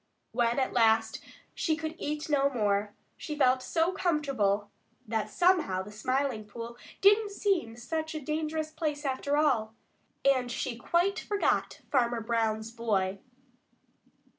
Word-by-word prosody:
When 235 +1 +1
at 265 - 0
last 225 -1 +3 0.3
she 325 -5 0
could 315 0 -4
eat 300 +1 -3
no 280 -2 +3
more, 205 -4 0 0.2
she 305 - -5
felt 255 -3 +3
so 330 +6 +1
comfortable 275 - 0 0.4
that 220 0 -1
somehow 345 - +2
the 205 - -10
Smiling 255 +2 -1
Pool 230 +3 -8 0.3
didn't 415 +2 +5
seem 390 - 0
such 315 +6 -4
a - - -2
dangerous 310 +1 -2
place 300 -2 -3
after 280 +2 0
all, 230 -8 +2 0.5
and 255 -3 +3
she 240 0 -2
quite 350 - +1
forgot 410 -1 0
Farmer 240 -3 +2
Brown's 220 -1 -1
boy. 200 -5 -1
260 Hz, 135 wpm, -29 LUFS, 225-310 Hz, 0.5 s, didn't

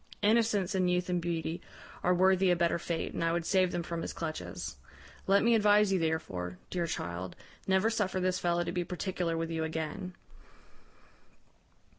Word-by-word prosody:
Innocence 210 -3 +3
and 185 -2 +2
youth 180 0 0
and 180 -1 +1
beauty 165 -1 -2 0.4
are 180 - +2
worthy 190 +1 +4
a 175 - +5
better 170 0 +1
fate, 170 -1 -3
and - - -2
I 165 - +2
would 170 0 -1
save 185 -1 +3
them 175 - -2
from 170 0 -4
his - - -4
clutches. 90 - -5 0.5
Let 195 +1 +5
me 235 +1 +4
advise 210 -2 +5
you 190 - +2
therefore, 95 - -2
dear 175 -2 -1
child, 90 - -4 0.3
never 190 +4 +3
suffer 200 -4 0
this 185 0 0
fellow 175 0 +1
to - - -3
be 175 0 -1
particular 180 -1 -2
with 165 0 -2
you 160 -1 -1
again.' 160 +3 -4
175 Hz, 175 wpm, -31 LUFS, 165-190 Hz, 0.5 s, a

